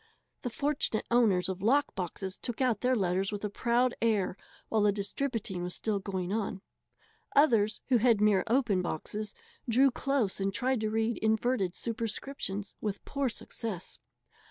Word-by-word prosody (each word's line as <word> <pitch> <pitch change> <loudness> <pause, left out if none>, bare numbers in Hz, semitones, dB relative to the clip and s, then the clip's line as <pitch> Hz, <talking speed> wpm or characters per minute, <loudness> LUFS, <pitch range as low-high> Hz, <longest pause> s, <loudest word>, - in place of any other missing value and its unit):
The 245 - -2
fortunate 280 -3 -1
owners 205 -7 +4
of 190 -1 -4
lock 275 +8 +3
boxes 190 +1 -4
took 240 -3 -4
out 250 -6 +1
their 255 +1 +3
letters 190 -1 0
with 205 0 -3
a 205 - -3
proud 240 +3 +2
air 210 -5 +2 0.3
while 220 - +1
the 205 0 +5
distributing 200 -1 -2
was 180 0 -3
still 210 -3 -1
going 190 -1 -3
on. 205 -3 -2 0.7
Others, 225 -8 +4
who 255 - +5
had 230 -2 +4
mere 210 -2 +4
open 230 -6 +2
boxes, 205 +5 -4 0.3
drew 260 +4 +5
close 260 -7 0
and 195 0 0
tried 255 +4 0
to 215 - 0
read 225 +1 0
inverted 220 -3 +1
superscriptions 225 -2 -3
with 205 -2 -3
poor 280 -2 -1
success. 215 -5 -6
215 Hz, 155 wpm, -30 LUFS, 195-245 Hz, 0.7 s, the